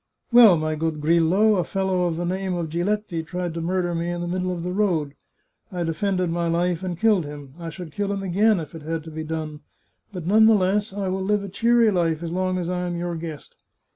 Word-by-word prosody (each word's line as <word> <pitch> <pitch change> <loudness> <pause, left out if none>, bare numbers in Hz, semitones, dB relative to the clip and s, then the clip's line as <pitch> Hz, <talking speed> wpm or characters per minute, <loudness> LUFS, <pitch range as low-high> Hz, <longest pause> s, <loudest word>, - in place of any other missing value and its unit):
" - - -57
Well, 230 -7 +8
my 155 0 -1
good 155 0 -2
Grillo, 170 +7 +3
a 180 - +1
fellow 190 -1 0
of 165 -2 -2
the 175 - -2
name 185 +1 -2
of 170 -2 -3
Giletti 175 +1 -1
tried 175 0 -4
to 165 - -4
murder 175 +1 -1
me 170 +1 -2
in 175 0 -3
the 175 - -3
middle 185 +1 -1
of 175 -2 -4
the 180 - -3
road. 175 -8 0 0.6
I 180 -2 -2
defended 180 +2 -1
my 170 0 -1
life, 170 +1 0
and 180 -3 -4
killed 215 -5 +3
him. 145 -2 -9
I 165 -1 -5
should 165 0 -8
kill 200 +4 -2
him 200 -1 -3
again, 200 +2 +3
if 160 - -8
it 165 - -8
had 160 +1 -4
to 160 - -10
be 160 0 -5
done. 155 -1 -5 0.5
But 180 -5 -7
none 220 +4 +5
the 225 - +6
less 200 +2 +1
I 195 0 -3
will 190 +1 -2
live 205 +1 0
a 200 - -6
cheery 230 +3 +3
life 170 -3 0
as 165 - -4
long 185 +1 -1
as 175 -2 -3
I 180 0 -2
am 175 - -3
your 175 0 -3
gfuest. 160 -3 -7
175 Hz, 245 wpm, -23 LUFS, 165-190 Hz, 0.6 s, Well